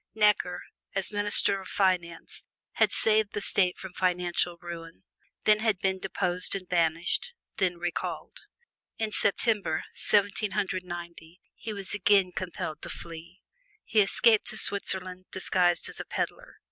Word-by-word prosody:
Necker, 210 -4 +2 0.3
as 195 +1 -1
Minister 205 -1 +5
of 190 - -11
Finance, 180 -4 -1 0.3
had - - +2
saved 215 -1 +3
the - - -2
State 185 -2 +2
from 190 -1 -9
financial 180 -1 0
ruin; 165 -1 -9 0.4
then 210 0 +4
had 220 -3 +1
been 190 0 -1
deposed 180 -1 0
and 185 -2 -6
banished; 170 - 0 0.2
then 180 -3 0
recalled. 175 0 -5 0.6
In 220 -1 -2
September, 200 -6 +1
Seventeen 205 0 +1
Hundred 185 -1 -2
Ninety, 175 -1 -9
he 225 - -7
was 200 -2 -6
again 200 -2 +3
compelled 170 -4 -5
to - - -6
flee. 170 +2 -9 0.4
He 220 - +2
escaped 220 +2 +3
to - - -2
Switzerland, 185 -2 +1
disguised 180 -2 +1
as - - -7
a - - -5
pedler. - - -4
185 Hz, 140 wpm, -28 LUFS, 175-205 Hz, 0.6 s, Minister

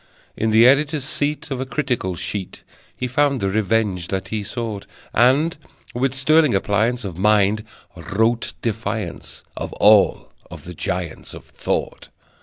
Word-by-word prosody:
In 110 - 0
the 110 +2 +6
editor's 145 +2 +3
seat 145 +2 -3
Of 130 -1 -2
a - - -2
critical 125 -9 -2
sheet 95 +2 -5 0.3
He 125 - -2
found 140 +2 +1
the 95 - 0
revenge 105 -3 0
that 95 0 -3
he 110 0 -3
sought; 110 -2 -5 0.3
And, 135 +8 +3 0.4
with 130 +2 0
sterling 150 -1 +4
appliance 110 +5 0
of 90 -3 -6
Mind, 105 +1 +3 0.3
wrote 115 +3 0
defiance 110 -5 -4
of - - -5
All 105 -1 +4 0.2
of - - -10
the 90 - -8
giants 85 0 -4
of - - -12
Thought. - - -4
110 Hz, 145 wpm, -21 LUFS, 100-130 Hz, 0.4 s, the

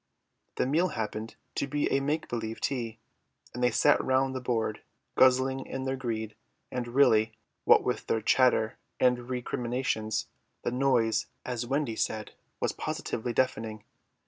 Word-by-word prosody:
The - - +1
meal 160 +7 +2
happened 110 - -4 0.2
to - - -1
be 145 +1 0
a 135 - +3
make 145 +3 -1
believe 115 -1 -4
tea, 120 -5 -2 0.6
and 125 - -5
they 125 - +5
sat 145 +3 +4
around 130 0 +2
the 130 - -3
board, 115 -4 -1 0.3
guzzling 130 +1 +4
in 135 - -4
their 130 0 -1
greed; 110 -4 -3 0.4
and 125 -1 -3
really, 115 -4 +4 0.3
what - - +7
with - - -2
their 115 - +1
chatter 110 -1 +3 0.2
and 125 -1 +2
recriminations, 120 -3 -1 0.4
the - - 0
noise, 120 -4 +2 0.2
as 120 -1 -3
Wendy 135 -3 0
said, 110 -1 -2 0.3
was - - +1
positively 120 +2 -3
deafening. 110 -4 -1
125 Hz, 145 wpm, -29 LUFS, 110-130 Hz, 0.6 s, what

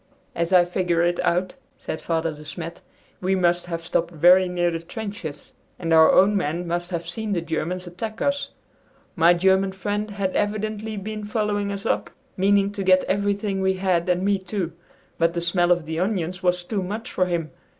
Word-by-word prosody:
"As 170 +1 -1
I 180 -1 +6
figure 175 -1 0
it 175 0 +1
out," 180 +2 +1 0.2
said 160 - -5
Father 165 -1 -1
De 150 0 -12
Smet, 160 +3 -6 0.4
"we 190 +1 +1
must 175 -1 +1
have 165 -1 -4
stopped 170 0 0
very 180 +3 +5
near 175 -1 +1
the 165 - -3
trenches, 200 -4 -7 0.2
and 165 -2 -1
our 160 0 +7
own 205 +2 +5
men 175 -1 -1
must 175 +1 -2
have 170 -2 -4
seen 210 +4 -3
the 180 - +1
Germans 180 +2 -3
attack 215 +6 -6
us. 280 0 0 0.7
My 170 -1 +5
German 190 +2 +3
friend 205 +2 -3
had 200 -2 -2
evidently 215 +1 -2
been 215 +2 -5
following 210 -1 -1
us 200 0 -5
up, - - 0 0.3
meaning 200 +1 +3
to 205 -1 -4
get 185 0 +5
everything 200 0 -1
we 190 0 +2
had 185 -2 0
and 180 +1 +1
me 200 0 +2
too. 185 -2 -3 0.5
But 165 +1 +2
the - - 0
smell 175 +1 +2
of 175 -2 +2
the 160 +1 -3
onions 185 -2 -1
was 180 -1 +1
too 200 +2 -2
much 210 +6 -5
for 185 - +1
him! 170 -3 -2
185 Hz, 190 wpm, -23 LUFS, 170-200 Hz, 0.7 s, our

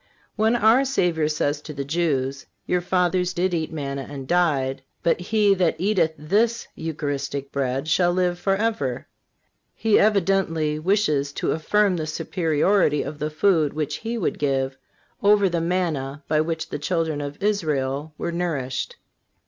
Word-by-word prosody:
When 220 +2 +2
our 235 +3 +5
Savior 175 - +1
says 145 -1 -1
to 150 0 -9
the 140 0 -3
Jews: 140 -4 -1 0.2
"Your 180 0 +1
fathers 180 0 +1
did 180 +1 0
eat 160 -2 -1
manna 140 -3 -4
and 135 -2 -7
died,... 140 -6 +1 0.2
but 170 - +2
he 205 +2 +3
that 180 -4 +1
eateth 175 -3 +1
this 210 +10 +1
(Eucharistic) 145 -3 -4
bread 135 +1 -1
shall 175 +3 +3
live 180 -1 0
forever," 195 - -1 0.7
He 220 -1 +3
evidently 185 -7 +2
wishes 155 -6 +1
to - - -1
affirm 190 +4 +2
the 155 -1 -3
superiority 160 0 +1
of 150 - -7
the 150 - -1
food 155 -2 +2
which 150 -1 -2
He 230 +1 -4
would 195 - -2
give, 135 -2 0 0.5
over 205 -1 +5
the 170 -2 -1
manna 155 -5 -2
by 155 0 +2
which 160 0 -3
the - - -4
children 160 -1 -1
of 145 0 -5
Israel 150 -7 -1
were 170 - -3
nourished. 155 -7 -2
160 Hz, 150 wpm, -23 LUFS, 145-185 Hz, 0.7 s, our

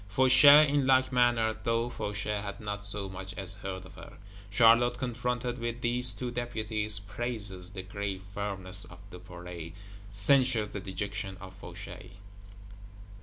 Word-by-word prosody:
Fauchet, 130 +6 +7
in 140 -1 +1
like 130 0 +4
manner; 120 -3 +2
though 115 0 0
Fauchet 105 -2 -3
had 100 +2 -6
not 105 -2 -5
so 100 -1 0
much 95 0 -8
as 95 -1 +3
heard 95 -1 -6
of 90 - -13
her. - - -12 0.4
Charlotte, 120 +3 +5
confronted 125 0 -3
with 120 +1 -4
these 120 +1 +3
two 125 +3 -4
Deputies, 110 -3 -2
praises 100 -3 -4
the 95 -2 -6
grave 95 0 -5
firmness 95 -1 -3
of 90 - -13
Duperret, 90 -2 -9 0.4
censures 125 -6 +3
the 105 - -5
dejection 95 0 -5
of 95 -1 -10
Fauchet. 95 - -10
105 Hz, 140 wpm, -29 LUFS, 95-120 Hz, 0.4 s, Fauchet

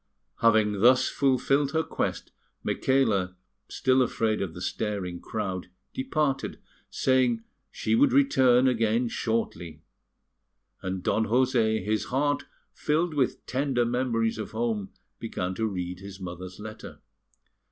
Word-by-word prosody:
Having 110 -3 +3
thus 130 +2 +5
fulfilled 140 +1 +1
her 160 0 +2
quest, - - -3 0.3
Micaela, 105 -9 +1 0.3
still 130 0 +2
afraid 110 -3 0
of 90 -4 -4
the - - -7
staring 90 -2 -3
crowd, 95 -4 -4 0.2
departed, 155 - -1 0.3
saying 125 -3 +2 0.3
she 110 - -2
would 115 - +5
return 130 -2 +4
again 115 -1 +2
shortly; 85 -10 -3 1.0
and 95 -1 -4
Don 110 +4 +1
José, 115 -3 +2
his 110 +1 0
heart 145 +3 0 0.3
filled 160 +2 0
with 135 -4 0
tender 130 -2 0
memories 115 -2 0
of 110 - -6
home, 110 -3 -1 0.3
began 90 +1 -3
to 110 +4 -1
read 90 -3 -4
his 100 0 -10
mother's 90 0 -7
letter. 110 +1 -9
115 Hz, 120 wpm, -27 LUFS, 100-130 Hz, 1.0 s, thus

